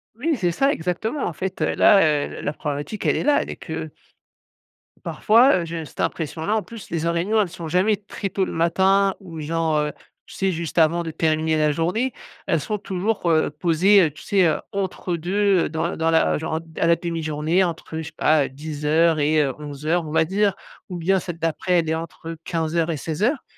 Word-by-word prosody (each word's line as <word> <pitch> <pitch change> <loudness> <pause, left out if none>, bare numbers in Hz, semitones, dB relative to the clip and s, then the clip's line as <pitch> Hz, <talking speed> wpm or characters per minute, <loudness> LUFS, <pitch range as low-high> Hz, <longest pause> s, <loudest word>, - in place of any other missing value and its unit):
Oui 300 +6 0
c'est 175 -3 +1
ça 275 +10 +2
exactement 200 - -2
en 170 - -3
fait, 190 +3 -5
heu, - - +1
là, 200 - +6 0.3
heu, - - -9
l - - -8
la 150 - -1
problématique 145 +8 -4
elle - - +3
est - - -1
là, 295 0 +3
elle - - -6
est - - -6
que 160 -2 -6 1.2
parfois, 235 +5 +4
heu, - - -4
j'ai 165 -1 -5
cette - - -16
impression 160 0 -3
là, 215 - +1
en 215 - +1
plus 230 -4 -11
les 165 -1 -2
en - - +2
réunions 200 +6 +1
elles 190 - -1
sont 170 -2 -7
jamais 185 +6 +2
très 200 -1 -6
tôt 190 +1 -1
le - - -6
matin 190 +4 +2
ou 170 -5 -9
genre, 160 0 0
heu, 150 0 -1 0.3
tu - - -13
sais 195 -1 0
juste 170 0 -5
avant 170 +1 +3
de 165 - -5
terminer 155 0 +1
la 150 -1 +3
journée. 180 - -1 0.3
Elles - - +2
sont 215 -2 -3
toujours, 195 -1 -2
heu, 155 -1 +3
posées, 185 +4 +4
heu, - - -6
tu 150 - -14
sais, 195 -3 +3
heu, - - +1
entre 190 -2 -2
2, 190 +2 +2
heu, - - -3
dans 160 +2 -2
dans 165 0 +1
la 160 - +3
genre 160 +1 -2
d 165 -1 -12
à - - +3
la 170 - +5
demi-journée 165 +1 0
entre 165 -2 -4
je 160 - -3
sais - - -9
pas, 150 -2 +3
heu, - - -6
10:00 155 +3 +1
et 150 +1 +3
heu, 135 -3 0
11:00 150 +3 -2
on 150 - -6
va 160 0 +3
dire. 200 +2 +1 0.3
Ou 180 - -5
bien 190 +3 +2
celle 175 -2 -6
d'après 165 +3 -1
elle 160 -1 -1
est 160 - +1
entre 165 0 -7
15:00 165 0 -1
et 155 - -3
16:00 210 - -1
170 Hz, 225 wpm, -22 LUFS, 160-190 Hz, 1.2 s, là